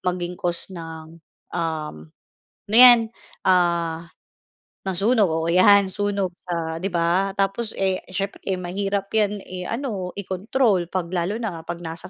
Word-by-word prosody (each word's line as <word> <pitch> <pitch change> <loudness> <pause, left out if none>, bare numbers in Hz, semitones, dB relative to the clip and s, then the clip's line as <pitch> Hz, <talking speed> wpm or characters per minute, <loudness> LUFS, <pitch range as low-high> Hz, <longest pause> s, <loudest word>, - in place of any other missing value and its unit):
maging 180 -1 -2
cause 175 +2 -1
ng, 165 -1 -9 0.3
uhm, 155 - -4 0.6
ano 215 - -1
'yan, 240 -2 +9 0.4
ah, 170 -2 +2 0.9
ng 185 - -2
sunog, 210 -1 +3
oo 160 0 -1
'yan 195 +3 +6
sunog 200 -1 -2 0.2
sa, 165 -1 -3
'di 195 - -1
ba? 175 +3 +1
Tapos, 195 +3 -1
eh, 190 -1 0
siyempre 195 +2 -3 0.2
mahirap 195 +2 -2
'yan 210 -1 +2
i-ano, 185 +1 -4
i-control 195 -1 0
kapag 180 -1 -3
lalo 180 +5 -1
na 195 -9 -4
kapag 170 +1 -6
nasa 165 +2 -7
185 Hz, 135 wpm, -23 LUFS, 170-200 Hz, 0.9 s, yan